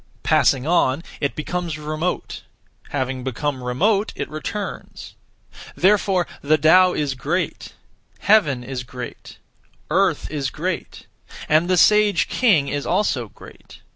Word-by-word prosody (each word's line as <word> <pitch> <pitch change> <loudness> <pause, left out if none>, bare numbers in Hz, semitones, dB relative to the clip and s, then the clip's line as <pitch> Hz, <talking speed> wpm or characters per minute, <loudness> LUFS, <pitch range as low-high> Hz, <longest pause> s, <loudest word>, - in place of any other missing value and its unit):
Passing 130 0 +3
on, 160 -3 +2 0.2
it 140 - -2
becomes 170 0 -3
remote. 155 +3 -3 0.5
Having 130 -2 -3
become 130 +1 -3
remote, 195 - +1
it - - -4
returns. 200 +7 -6 0.6
Therefore 190 -2 +2 0.2
the 155 +2 +3
Tao 180 +5 +5
is 145 -3 -1
great; 150 +8 -3 0.5
Heaven 155 - +3
is 125 0 -5
great; 125 -1 -9 0.5
Earth 185 -2 +1
is 140 -3 -2
great; 175 +3 -5 0.4
and 155 +4 +3
the 185 - +3
(sage) 210 +1 +4
king 190 - +3
is 145 0 -3
also 130 - 0
great. - - -15
155 Hz, 120 wpm, -21 LUFS, 135-185 Hz, 0.6 s, Tao